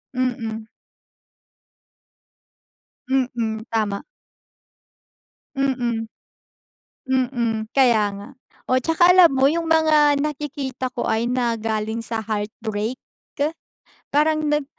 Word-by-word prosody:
Mm. 225 -3 -2 2.4
Mm, 240 -4 -1
tama. 210 -3 -1 1.5
Mm, 245 -4 0 1.0
mm 245 -3 0 0.2
kaya 240 -6 +4
nga, 200 0 -9 0.4
o 255 - +3
tsaka 325 +6 +4
alam 360 -4 +7
mo 265 0 +4
yung 335 +2 -1
mga 305 -3 +4
nakikita 275 -3 -4
ko 245 - -3
ay 220 +1 +1
na 240 -2 0
galing 220 0 -2
sa 225 -1 -3
heartbreak 215 +2 -3 0.3
ke 290 +1 +1 0.6
parang 310 +2 +2
nag 295 0 +1
250 Hz, 95 wpm, -22 LUFS, 225-285 Hz, 2.4 s, alam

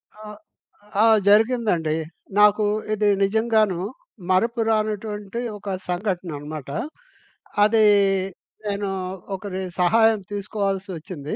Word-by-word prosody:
ఆ! 215 - -13 0.8
ఆ! - - +6 0.2
జరిగిందండి. 210 -7 +3 0.4
నాకు 210 +1 +5 0.3
ఇది 210 0 +1 0.2
నిజంగాను 215 -2 +2 0.5
మరుపు 230 +6 +2
రానటువంటి 215 0 -2 0.2
ఒక 195 -1 -4
సంఘటనన్నమాట. 170 -6 -4 0.9
అది 215 +1 +4 0.8
నేను 200 -1 -2 0.5
ఒకరి 190 -1 -5 0.2
సహాయం 220 +4 +4
తీసుకోవాల్సొచ్చింది. 195 -6 -4
205 Hz, 80 wpm, -23 LUFS, 185-215 Hz, 0.9 s, ఆ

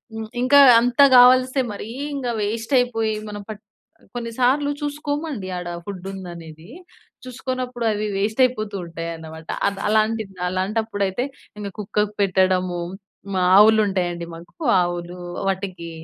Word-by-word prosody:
హ్మ్, 220 -1 -6
ఇంకా 285 +3 +6 0.2
అంత 245 +2 -1 0.2
కావలిస్తే 255 +2 +6
మరి 205 - -7 0.3
ఇంకా 250 -3 -2
వేస్ట్ 225 +5 -3
అయిపోయి 225 -3 0 0.2
మనం 205 -1 -7
పట్ 215 0 -9 0.5
కొన్ని 235 -1 -4
సార్లు 275 +4 +3
చూసుకోమండి 290 - -3
ఆడ 180 - -6 0.2
ఫుడ్డుందనేది. 180 -3 -8 0.5
చూసుకోనప్పుడు 255 -1 -4
అవి 210 0 -2
వేస్ట్ 215 +4 -1
అయిపోతూ 215 -5 -1
ఉంటాయన్నమాట. 165 -1 -7 0.2
అద్ 200 -1 -3
అలాంటి 220 +1 +2 0.2
అలాంటప్పుడైతే 200 +2 -1 0.3
ఇంక 205 - -5
కుక్కకు 210 0 -1
పెట్టడము. 185 -2 +1 0.6
మా 185 - +1
ఆవులు 220 +1 +7
ఉంటాయండి, 175 -3 -2
మాకు 175 - -10 0.2
ఆవులు. 175 0 -4 0.3
వాటికి 185 -3 -4
210 Hz, 120 wpm, -22 LUFS, 185-245 Hz, 0.6 s, ఆవులు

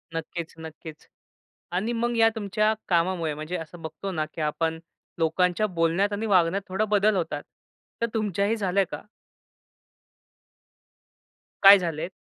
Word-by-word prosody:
नक्कीच-नक्कीच 160 -1 -7 0.7
आणि 200 +7 -1
मग 235 +1 -1
या 225 0 +6
तुमच्या 215 0 +1 0.2
कामामुळे 170 -3 +1
म्हणजे 155 +4 -4
असं 165 +1 -9
बघतो 160 +5 -6
ना, 155 -3 -1
की 155 +1 -10
आपण 160 +1 -1 0.4
लोकांच्या 180 +5 +2
बोलण्यात 175 +2 +1
आणि 210 +2 -2
वागण्यात 190 -1 +3
थोडा 190 +3 0
बदल 210 0 +2
होतात. 160 -5 -2 0.6
तर 235 - +2
तुमच्याही 210 0 0
झालंय 195 -1 +1
का? 150 - -6 2.6
काय 200 +1 +11
झालेत? 170 -2 -3
180 Hz, 125 wpm, -26 LUFS, 165-205 Hz, 2.6 s, काय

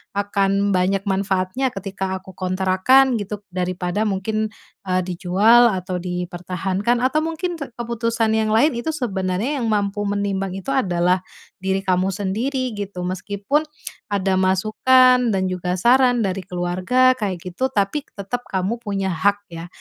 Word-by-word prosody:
akan 200 0 +1
banyak 190 +2 +1
manfaatnya 195 +5 0
ketika 190 -1 -4
aku 190 0 -14
kontrakan 190 +9 +3
gitu, 205 0 -6
daripada 180 +2 -1
mungkin, 215 +2 -1 0.4
eee, 185 0 +1
dijual 200 +7 +4
atau 185 -1 -3
dipertahankan 180 +5 -2
atau 265 +4 +2
mungkin 330 +2 -3
keputusan 230 -3 -2
yang 220 -1 +1
lain 290 +7 +4
itu 240 +7 -2
sebenarnya 210 +1 -2
yang 230 - -1
mampu 205 -1 0
menimbang 200 -2 -2
itu 195 +8 -5
adalah 180 -7 +1 0.4
diri 190 0 -1
kamu 185 -1 +1
sendiri, 235 +7 -2
gitu. 200 -3 -5
Meskipun 200 - -1 0.5
ada 195 -1 +1
masukan 245 +6 +4
dan 190 -1 0
juga 180 0 -2
saran 245 +2 +4
dari 190 0 -2
keluarga 185 +9 +2
kayak 195 -4 -2
gitu, 255 +9 -1
tapi 205 +6 0
tetap 205 +5 -4
kamu 195 +5 -1
punya 195 -3 -2
hak 205 +4 +1
ya, 165 +1 -7
200 Hz, 135 wpm, -21 LUFS, 185-235 Hz, 0.5 s, dijual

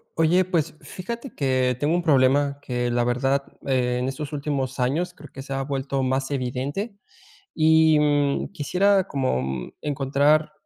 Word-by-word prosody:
Oye, 170 +3 +3
pues, 165 -4 -1
fíjate 235 +8 -7
que 130 -2 +1
tengo 150 +5 +1
un 175 - 0
problema 140 -1 +3
que, 120 -1 -2
la 120 0 +1
verdad, 135 +3 +1 0.2
en 125 -1 0
estos 145 +3 -5
últimos 140 -3 -3
años 155 +9 0
creo 150 -1 -13
que 135 - -7
se 135 0 -6
ha 135 0 -1
vuelto 135 -1 -2
más 130 +1 0
evidente. 140 - -3 0.6
Y, 160 -1 +5
mm, 145 -1 +1
quisiera 190 +6 +2
como 65 - -2
encontrar 145 +2 +2
140 Hz, 145 wpm, -24 LUFS, 130-155 Hz, 0.6 s, Y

